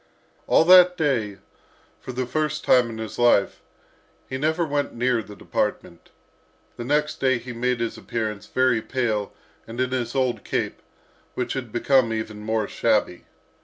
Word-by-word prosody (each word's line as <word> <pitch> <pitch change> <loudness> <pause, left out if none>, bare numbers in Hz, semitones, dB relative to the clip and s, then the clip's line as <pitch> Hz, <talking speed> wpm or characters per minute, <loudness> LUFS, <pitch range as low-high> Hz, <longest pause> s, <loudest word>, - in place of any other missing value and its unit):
All - - +4
that 180 0 +7
day, 120 - 0 0.6
for - - -8
the 125 +1 -2
first 150 +3 -2
time 125 -2 +4
in 110 - -7
his 110 0 -6
life, 120 -5 +3 0.7
he 130 - -5
never 160 +5 0
went 145 -3 -2
near 120 0 +1
the 105 -1 -12
department. 85 -3 -3 0.7
The - - -6
next 150 +4 0
day 130 -1 +2
he 120 +1 -8
made 125 +1 -1
his 115 - -3
appearance, 110 -3 -4
very 130 -3 +2
pale, 110 -5 -2 0.4
and 115 +2 -8
in 130 0 0
his 125 -1 -2
old 130 -2 0
cape, - - -3 0.5
which 125 - -2
had 125 -4 -5
become 120 0 +2
even 110 -1 -4
more 110 0 -1
shabby. 105 -6 0
120 Hz, 160 wpm, -24 LUFS, 110-135 Hz, 0.7 s, that